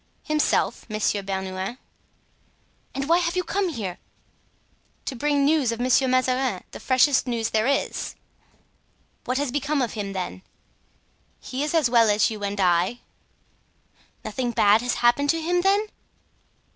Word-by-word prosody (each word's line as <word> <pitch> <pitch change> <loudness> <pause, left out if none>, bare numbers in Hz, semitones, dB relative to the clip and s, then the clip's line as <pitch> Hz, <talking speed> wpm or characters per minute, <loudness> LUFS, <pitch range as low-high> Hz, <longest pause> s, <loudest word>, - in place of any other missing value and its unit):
"Himself, 305 -5 0
Monsieur 215 -1 0
Bernouin." 190 +3 -4 1.2
"And 275 0 -2
why 335 +2 +4
have 340 0 -1
you 365 - 0
come 390 -1 -1
here?" 205 - -5 1.1
"To 265 - -4
bring 285 +2 +1
news 290 -5 +2
of 230 - -5
Monsieur 255 +2 +3
de - - 0
Mazarin—the 255 -5 -1
freshest 260 +1 +3
news 230 -2 -1
there 220 +2 +1
is." 280 0 -1 1.1
"What 255 - -1
has 285 -2 -1
become 290 +2 -1
of 245 -4 -1
him, 200 -3 -4
then?" 180 - -5 1.0
"He 260 - -5
is 300 +2 -2
as 315 -6 +4
well 235 -2 +4
as 210 +2 +3
you 210 -2 -6
and 200 0 -3
I." 180 +5 +2 1.2
"Nothing 255 -2 -2
bad 215 -1 +4
has 245 0 -1
happened 285 +4 +3
to 330 - +2
him, 350 +2 +1
then?" 400 +3 +2
250 Hz, 145 wpm, -24 LUFS, 210-290 Hz, 1.2 s, why